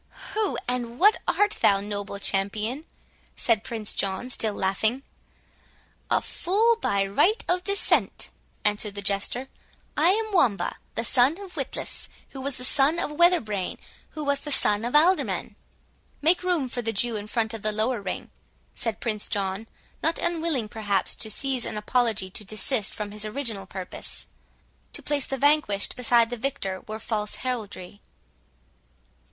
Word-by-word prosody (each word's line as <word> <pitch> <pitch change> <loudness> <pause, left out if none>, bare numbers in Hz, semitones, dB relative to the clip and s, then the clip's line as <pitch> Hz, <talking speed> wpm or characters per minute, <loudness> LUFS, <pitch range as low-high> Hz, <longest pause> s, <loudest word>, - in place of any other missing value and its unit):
"Who, 430 -2 0
and 245 -1 -2
what 415 +6 +6
art 415 0 +2
thou, 200 -1 +5
noble 205 0 -4
champion?" 210 +8 0 0.5
said 225 -3 +1
Prince 220 -3 -4
John, 195 +6 -2
still 220 -4 0
laughing. 215 +7 0 1.1
"A - - +3
fool 435 +6 +2
by 200 - +1
right 350 - +2
of 360 0 +1
descent," 400 +1 +1 0.3
answered 210 0 0
the 200 - -4
Jester; 200 +6 0 0.5
"I 320 +4 +4
am 435 +2 +1
Wamba, 240 - +2 0.2
the 230 - -1
son 255 +6 +4
of 390 -3 -10
Witless, - - -2 0.2
who 265 - -8
was 275 0 -3
the 250 - -7
son 280 +5 +4
of 340 - -1
Weatherbrain, 295 - +2 0.3
who 310 - -6
was 285 -1 +1
the 295 - -6
son 210 -5 +2
of 245 - -2
an 300 - +8
Alderman." 370 +2 0 0.6
"Make 330 +4 +3
room 355 -7 +1
for 245 0 -4
the 225 -1 -1
Jew 230 +3 0
in 205 0 -5
front 220 0 0
of 225 - -6
the 215 - 0
lower 220 +2 0
ring," 190 -2 -5 0.4
said 225 -3 -2
Prince 215 -3 -1
John, 195 +2 -1 0.3
not 330 - +1
unwilling 320 -9 0
perhaps 205 -3 0
to 220 - -2
seize 260 +2 0
an - - -3
apology 215 -3 +1
to 210 - -4
desist 215 +2 +1
from 210 -1 -5
his 210 0 -3
original 215 -4 -2
purpose; 185 -1 -6 0.7
"to - - -7
place 290 -2 0
the 270 - -2
vanquished 285 -8 +3
beside 235 -1 +3
the 245 - -3
victor 220 -7 -2
were 215 - -4
false 210 -1 -2
heraldry." 205 -6 -4
230 Hz, 160 wpm, -26 LUFS, 205-285 Hz, 1.1 s, an